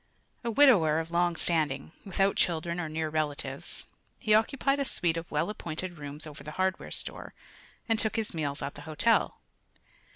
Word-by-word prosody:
A 235 - -1
widower 210 - +5
of 165 +1 -5
long 175 0 +2
standing, 155 -5 +1
without 195 0 +1
children 170 0 +1
or 165 -3 -3
near 160 0 -2
relatives, 150 -2 -3 0.3
he 215 - +1
occupied 275 +5 +2
a - - +2
suite 175 -10 +1
of 165 0 -5
well 150 +7 0
appointed 175 -3 -5
rooms 145 +1 -6
over 150 -1 -10
the 150 - -7
hardware 190 0 0
store - - -3 0.5
and 225 -1 +2
took 220 - +2
his 225 -3 -2
meals 145 -3 -2
at 140 - -3
the 145 - -10
hotel. 220 +9 +3
170 Hz, 170 wpm, -29 LUFS, 155-210 Hz, 0.5 s, widower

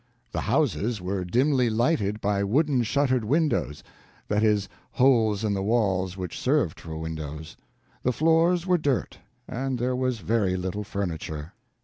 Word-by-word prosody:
The - - -2
houses 110 +1 0
were 95 +1 -2
dimly 125 +6 +2
lighted 110 -3 0
by 100 0 +1
wooden 135 +5 +2
shuttered 130 +1 +1
windows—that 115 - -2
is, 105 -3 +2 0.3
holes 115 -6 +3
in 105 -2 +1
the 100 - -1
walls 95 -4 0
which 90 -3 -5
served 130 - +1
for 80 -1 -7
windows. 80 -1 -6 0.5
The 125 - +1
floors 165 +5 +3
were 180 -2 +3
dirt, 140 -4 -1 0.3
and 130 +1 -2
there 125 +1 0
was 130 -1 0
very 100 -3 0
little 95 +3 -3
furniture. 85 -5 -4
110 Hz, 140 wpm, -26 LUFS, 95-130 Hz, 0.5 s, holes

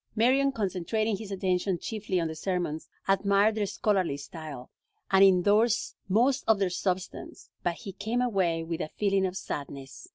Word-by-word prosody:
Marion, 265 +5 +3
concentrating 210 0 -1
his 215 -1 -8
attention 185 -1 0
chiefly 205 -2 -2
on 165 - 0
the 160 - -4
sermons, 165 -2 -3 0.2
admired 200 +2 +3
their 210 -2 -1
scholarly 190 -7 0
style, 145 -2 -9 0.4
and 190 0 +6
indorsed 205 +5 +3
most 250 +8 +3
of 220 -2 +5
their 195 -2 0
substance, 185 0 -4
but 175 -1 -1
he 200 +1 -8
came 220 +5 -2
away 190 -9 +1
with 165 +1 -4
a - - -3
feeling 195 -2 +2
of 185 +1 -5
sadness. 135 -6 -7
195 Hz, 160 wpm, -28 LUFS, 175-215 Hz, 0.4 s, and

